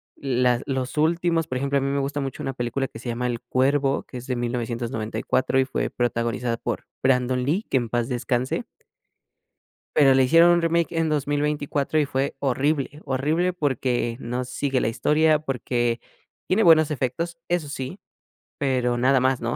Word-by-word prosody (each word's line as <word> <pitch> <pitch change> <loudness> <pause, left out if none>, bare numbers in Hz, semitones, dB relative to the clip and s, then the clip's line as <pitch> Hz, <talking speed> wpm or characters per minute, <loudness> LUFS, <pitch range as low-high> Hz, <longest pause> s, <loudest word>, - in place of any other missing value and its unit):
las 125 -2 +1
los 130 0 -3
últimos, 165 +1 +1
por 130 - -3
ejemplo, 140 +1 0
a - - +1
mí 135 - -1
me 140 0 0
gusta 140 +1 -2
mucho 135 -2 -4
una 135 - -3
película 125 +2 -2
que - - -11
se - - -9
llama 125 +1 -1
El 120 -1 -2
cuervo, 135 +3 +1
que 125 - -9
es 125 +2 -9
de 125 - -1
1994 120 0 -1
y 130 - +3
fue - - -2
protagonizada 120 0 -1
por - - -4 0.2
Brandon 125 -1 +2
Lee, 175 - 0
que 135 - +2
en 120 -2 -1
paz 120 +2 -1
descanse. 125 +1 -1 1.3
Pero 135 -3 +6
le 130 0 +5
hicieron 165 +6 +6
un 170 -1 +2
remake 165 0 +1
en 165 -1 +1
2024 145 0 0
y 150 - +3
fue 135 +1 -1
horrible, 140 +2 0
horrible 155 +7 0
porque 130 -7 -1
no 125 +1 -3
sigue 130 +1 -1
la - - +1
historia, 155 +6 +3
porque 120 -4 -1 0.5
tiene 210 +4 +2
buenos 160 -3 +6
efectos, 150 +5 -2
eso 175 -4 0
sí, 135 +5 -5 0.6
pero 125 -4 +1
nada 130 +2 +4
más, 130 0 +1
¿no?, 120 +1 -2
135 Hz, 175 wpm, -24 LUFS, 125-150 Hz, 1.3 s, Pero